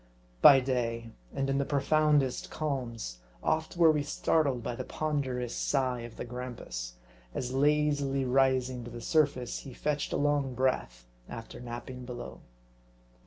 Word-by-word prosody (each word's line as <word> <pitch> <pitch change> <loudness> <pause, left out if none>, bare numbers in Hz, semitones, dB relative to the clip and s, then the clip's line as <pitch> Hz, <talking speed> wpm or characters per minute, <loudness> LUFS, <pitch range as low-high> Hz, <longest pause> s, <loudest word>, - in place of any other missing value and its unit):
By 135 -1 +9
day, 115 -3 -2 0.2
and 135 - -1
in 135 0 +1
the - - +2
profoundest 145 -1 +2
calms, 120 - -3 0.2
oft 160 +2 0
were 165 -2 +7
we 150 -1 +1
startled 145 -3 +1
by 120 - -2
the - - -4
ponderous 130 -6 -2
sigh 130 -3 0
of 115 -1 -9
the - - -4
grampus, 115 - -6 0.4
as 125 0 -3
lazily 145 -1 +2
rising 130 -1 +2
to 120 - -7
the 120 0 -7
surface, 140 -3 +1
he 130 -3 -10
fetched 150 -1 -1
a - - 0
long 145 -3 +1
breath 115 - -1 0.2
after 115 -1 -8
napping 125 +1 -7
below. 95 - -7
130 Hz, 145 wpm, -30 LUFS, 120-145 Hz, 0.4 s, By